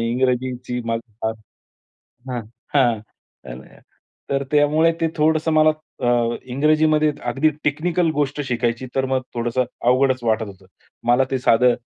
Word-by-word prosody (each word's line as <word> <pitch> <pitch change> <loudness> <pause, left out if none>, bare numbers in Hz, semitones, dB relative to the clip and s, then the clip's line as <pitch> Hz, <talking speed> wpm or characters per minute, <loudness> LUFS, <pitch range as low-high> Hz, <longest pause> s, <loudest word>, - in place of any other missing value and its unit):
इंग्रजीची 125 0 -1
मला 115 0 -1 0.2
फार 110 0 0 1.0
हां, 125 -1 -2 0.3
हां, 120 -6 +3 0.5
तर - - -9
अ, - - -20 0.5
तर 135 0 +1
त्यामुळे 150 +3 +4
ते 165 - +2
थोडंसं 160 +1 +2
मला 155 0 +5 0.3
अ, 120 -1 +1
इंग्रजीमध्ये 155 +3 +2
अगदी 135 +6 +2
टेक्निकल 165 +3 +1
गोष्ट 145 0 -1
शिकायची, 120 0 -1
तर 135 - +1
मग 130 0 0
थोडंसं 120 +2 0 0.2
अवघडच 130 0 +3
वाटत 110 0 +1
होतं. 95 -1 -13 0.4
मला 125 +2 +5
ते 130 - 0
साधं 125 0 +4
130 Hz, 135 wpm, -21 LUFS, 120-150 Hz, 1.0 s, मला